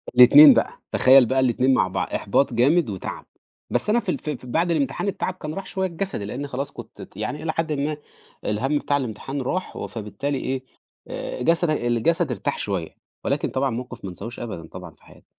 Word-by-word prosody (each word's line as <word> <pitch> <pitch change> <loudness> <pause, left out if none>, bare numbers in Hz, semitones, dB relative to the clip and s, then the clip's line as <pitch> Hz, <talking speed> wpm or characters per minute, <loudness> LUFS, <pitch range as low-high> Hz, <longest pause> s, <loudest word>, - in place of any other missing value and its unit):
الاتنين 140 +4 +10
بقى - - +1 0.2
تخيّل 130 -1 +6
بقى 130 +3 +1
الاتنين 130 +1 +3
مع 95 - +3
بعض، 95 - -2
إحباط 125 +6 +1
جامد 140 +4 +3
وتَعب، 95 -2 -6 0.4
بس - - 0
أنا 235 +3 +4
في 210 - -6
ال - - 0
في 150 - -4
ال 135 - -4
في 125 - -13
بعد 170 +7 +1
الامتحان 155 +6 -1
التَعب 185 -1 -2
كان 155 -4 -7
راح 195 - -6
شوية 190 0 -1
الجسدي، 170 - -4
لأنّي 135 +7 -5
خلاص 140 +1 -4
كنت - - -11
ت - - -12
يعني 145 +9 -4
إلى 160 - 0
حدٍ 165 -1 -2
ما 145 +1 -2 0.5
الهمّ 135 +8 0
بتاع 145 0 0
الامتحان 135 +2 -4
راح، 185 +9 -3
و - - -5
فبالتالي 125 +6 -4
إيه 130 0 -3 0.4
آآ، - - -5
جسدك 165 +1 +2
الجسد 155 +9 +1
ارتاح 140 - -2
شوية، 95 -6 -2 0.3
ولكن - - 0
طبعًا 135 +1 0
موقف 120 0 -6
ما - - -4
أنساهوش 110 +7 -7
أبدًا، 105 -9 -6
طبعًا 90 -2 -10
في - - -29
حياتي. - - -19
135 Hz, 205 wpm, -23 LUFS, 120-155 Hz, 0.5 s, الاتنين